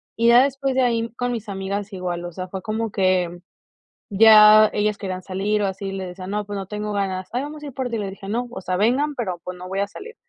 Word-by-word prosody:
Y 230 +1 +2
ya 240 +2 +7
después 275 -1 -1
de 260 - +3
ahí 230 -2 +1
con 245 0 -2
mis 225 -3 -5
amigas 200 +1 -4
igual, 175 -2 -4
o 175 - -6
sea, 185 +2 -6
fue 190 0 -6
como 220 0 -3
que 185 -3 +1 0.7
ya 215 0 +8
ellas 210 0 0
querían 185 -2 -5
salir 200 +3 -1
o - - +2
así, 195 +1 -4
y 195 - -5
les 190 -1 -4
decía: 185 +1 -8
"No, 210 +1 -2
pues 205 0 -5
no 195 -1 -5
tengo 210 +1 -4
ganas". 190 -2 -2
"Ay, 250 +3 -1
vamos 295 +1 -8
a - - -6
ir 280 - -7
por 260 -2 -3
ti". 230 - -2
Y - - -2
le 200 -2 -3
dije: 195 0 -10
"No, 240 +4 -1
o - - -6
sea, 185 0 -2
vengan, 265 +9 +1
pero 185 -8 -3
pues 180 0 -7
no 180 - -8
voy 195 +1 -2
a 200 - -1
salir". 445 - -10
205 Hz, 275 wpm, -22 LUFS, 190-230 Hz, 0.7 s, ya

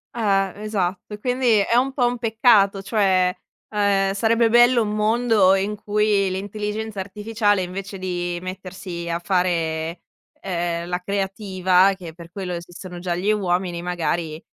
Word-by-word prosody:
Eh, 195 -4 +1
esatto. 195 -1 -2
E 210 - -14
quindi 250 -2 +2
è 215 +4 +1
un 260 +3 +3
po' 255 -2 +1
un 240 0 -1
peccato, 220 -4 +3
cioè, 190 -3 +2 0.3
ehm, 200 -2 +1
sarebbe 230 +3 +2
bello 240 0 +5
un 210 - -3
mondo 215 -3 +3
in 200 +2 -1
cui 210 -1 +1
l'intelligenza 210 +2 -4
artificiale 205 0 0
invece 195 +2 -6
di 175 -1 -3
mettersi 185 -2 -6
a 170 - 0
fare, 170 -3 -1 0.4
ehm, 170 -2 -3
la 180 0 -2
creativa, 190 -1 +2
che 170 -4 -9
per 170 0 -12
quello 185 -2 -5
esistono 175 +1 -8
già 175 -1 -2
gli 195 +4 +1
uomini, 180 -3 -1
magari, 170 -2 -2
195 Hz, 145 wpm, -22 LUFS, 180-210 Hz, 0.4 s, bello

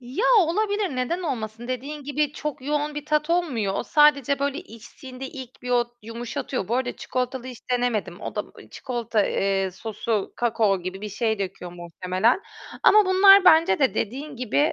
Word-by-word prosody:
Ya, 255 - -3 0.2
olabilir. 400 -1 0
Neden 295 +9 -1
olmasın? 235 -6 -4
Dediğin 275 +4 -5
gibi 290 +1 -1
çok 300 -3 -5
yoğun 295 +1 -1
bir 295 -1 -5
tat 300 +1 0
olmuyor. 260 - 0
O - - -1
sadece 285 -2 +3
böyle, 280 +1 -1
içtiğinde 255 - -10
ilk 260 -2 -10
bir 250 - -5
o 245 -1 +3 0.2
yumuşatıyor. 230 -1 -5
Bu 235 - +1
arada 250 -1 -2
çikolatalı 255 0 -3
hiç 250 -3 -8
denemedim. 225 -7 -1
O - - -6
da, - - 0
ııı, - - -13
çikolata, 235 -4 -1
eee, 195 -1 0
sosu 215 +2 -3
kakao 220 -5 +1
gibi 185 +2 -6
bir 210 - -5
şey 220 +1 -1
döküyor 185 -2 -5
muhtemelen 185 - 0 0.4
ama 425 0 +7
bunlar 390 +1 +7
bence 320 - +6
de 265 - +2
dediğin 275 +6 -4
gibi, 255 +5 +1
250 Hz, 170 wpm, -24 LUFS, 220-295 Hz, 0.4 s, ama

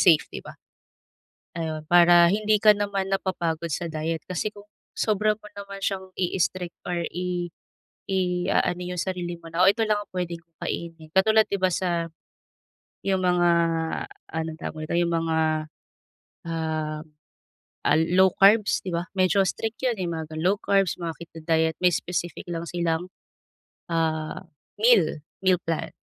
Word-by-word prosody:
safe, 165 -5 +6
di - - -5
ba? - - -10 1.0
Ayun 160 -1 -3
para 175 0 +7
hindi 215 +1 +2
ka 215 -1 +8
naman 200 -2 -1
napapagod 170 -4 -1
sa 170 +3 -2
diet 160 0 -3
kasi 185 +4 -2
kung 205 0 -14 0.3
sobra 215 0 +1
mo 210 -1 -13
naman 200 0 -8
siyang 190 -1 -2
i-strict 180 -1 -1
or 175 -1 -1
i 180 -1 -3 0.6
iaano 180 -1 +1
yung 170 - -1
sarili 180 -2 -3
mo 165 - -10
na 170 +2 +1
o 195 - +8
ito 225 +2 -4
lang 210 -1 +2
ang - - -31
puwede 175 -2 -3
kong 165 -1 -34
kainin 165 -2 -5
katulad 220 +3 +5
di 200 - 0
ba, 185 - +4
sa 170 -2 0 1.0
yung 190 -1 +1
mga 175 -1 +3 0.9
anong 160 0 -3
tawag 155 0 -5
dito 170 - 0
yung 170 -1 +1
mga, 165 -1 0 1.1
um, 155 -1 -2 0.8
ah, - - +5 0.2
low 190 0 +6
carbs, 205 +1 +5
di - - -5
ba? 170 - -1
Medyo 185 +1 +4
strict 225 0 -4
yun, 240 -3 +1
eh, 180 - -1
mga 160 -1 -5
low 185 +5 +3
carbs 195 -3 +2
mga 170 -1 -2
keto 165 -1 -10
diet 160 -1 +2
may 180 - +6
specific 175 0 -3
lang 165 -1 -3
silang, 170 0 -1 0.8
ah, 160 -1 -1 0.4
meal 210 -10 +4 0.2
meal 185 -2 +4
plan. 165 -1 -3
175 Hz, 155 wpm, -25 LUFS, 165-195 Hz, 1.1 s, ka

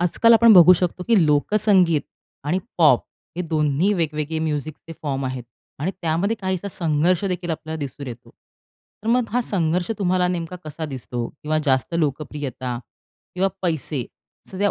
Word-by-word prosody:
आजकाल 180 +6 +4
आपण 230 0 +7
बघू 180 -2 +9
शकतो, 180 0 -1
की 215 -7 +5
लोकसंगीत 180 +1 +3 0.4
आणि 165 +6 0 0.2
पॉप 150 -7 +6 0.4
हे 180 - -1
दोन्ही 155 +2 +1
वेगवेगळे 160 -2 -2
म्युझिकचे 155 0 -4
फॉर्म 135 -3 -2
आहेत 130 -2 -5 0.3
आणि 155 +7 -1
त्यामध्ये 170 +7 0
काहीसा 190 0 -2
संघर्ष 170 +1 +1
देखील 180 -2 -2
आपल्याला 160 0 -4
दिसून 140 -1 -6
येतो. 120 -3 -9 0.7
तर - - -7
मग 245 0 +2
हा 245 - +2
संघर्ष 175 -3 0
तुम्हाला 180 -2 +1
नेमका 175 0 -3
कसा 155 +1 -6
दिसतो? 125 -4 -5
किंवा 155 +1 -3
जास्त 130 +2 +1
लोकप्रियता 140 -5 -3 0.6
किंवा 190 +2 +2
पैसे 155 -6 -1 0.5
सध्या 200 +1 0
165 Hz, 145 wpm, -22 LUFS, 150-185 Hz, 0.7 s, बघू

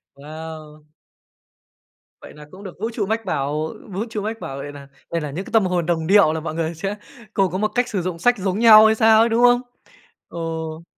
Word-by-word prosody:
Wow! 155 +1 -10 1.4
Vậy - - -12
là 150 0 -13
cũng 190 +2 -13
được 185 -2 -10
vũ 225 +3 -2
trụ 220 -3 -2
mách 220 +2 -2
bảo, 150 -1 -2 0.2
vũ 195 +4 -3
trụ 215 -2 -4
mách 225 +2 -4
bảo 135 - -7
vậy 145 +1 -7
nà 140 -1 -12 0.2
đây 170 -1 -1
là 150 -2 -5
những 185 +7 -5
cái - - -11
tâm 220 -3 +4
hồn 180 -3 -1
đồng 165 -2 -1
điệu 195 -5 +5
là 160 - -3
mọi 155 0 -6
người 165 0 -2
sẽ 195 +5 -4 0.4
cù 195 -2 +2
có 185 - -3
một 215 +2 +1
cách 245 0 +1
sử 195 - -2
dụng 175 -1 -4
sách 245 +5 +2
giống 190 0 -2
nhau 220 -2 +8
hay 220 - +4
sao 220 -1 +5
ấy, 230 - +4
đúng 230 +1 +1
không? 245 0 +5 0.7
Ồ! 165 -1 -5
180 Hz, 230 wpm, -21 LUFS, 160-215 Hz, 1.4 s, nhau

